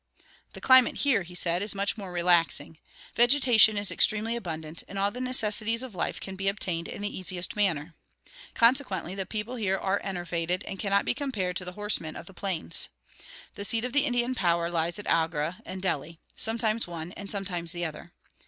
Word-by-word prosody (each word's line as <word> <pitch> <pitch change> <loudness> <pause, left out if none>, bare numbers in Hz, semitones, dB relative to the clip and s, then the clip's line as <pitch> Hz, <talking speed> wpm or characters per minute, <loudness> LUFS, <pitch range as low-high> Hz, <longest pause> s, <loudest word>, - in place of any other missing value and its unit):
"The - - -10
climate 260 -2 +6
here," 275 -8 +2
he 175 0 -9
said, 175 0 +1
"is 205 0 -1
much 200 +1 0
more 195 -5 -7
relaxing. 170 -3 +2 0.3
Vegetation 240 -4 +5
is 205 -1 0
extremely 220 +2 +2
abundant, 160 -7 -4
and 200 - -7
all 200 +1 +2
the 250 - -6
necessities 230 -2 +1
of 255 -4 -8
life 175 - -2
can 190 - -6
be 195 +1 -3
obtained 180 -4 0
in 205 - -6
the 205 - -3
easiest 185 -1 -2
manner. 170 -6 0 0.6
Consequently 250 - +2
the 195 -1 -4
people 220 +4 -4
here 195 -4 +1
are 195 +1 0
enervated, 175 -1 -2
and 195 - -7
cannot 200 -1 +2
be - - +2
compared 215 -11 -2
to 185 - -5
the 180 - -5
horsemen 205 -6 -2
of - - -8
the 195 - -14
plains. 180 -4 -3 0.6
The 200 - -6
seat 225 +3 +1
of 250 - -4
the 290 0 +4
Indian 245 -1 +1
power 170 -6 +1
lies 170 +1 0
at 205 - -7
Agra 165 +3 0
and 185 0 -6
Delhi 165 -2 -1 0.2
sometimes 225 -1 0
one 170 0 -6
and 200 +1 -8
sometimes 180 -4 -1
the 175 -1 -2
other. 160 +2 -7
195 Hz, 190 wpm, -28 LUFS, 175-220 Hz, 0.6 s, climate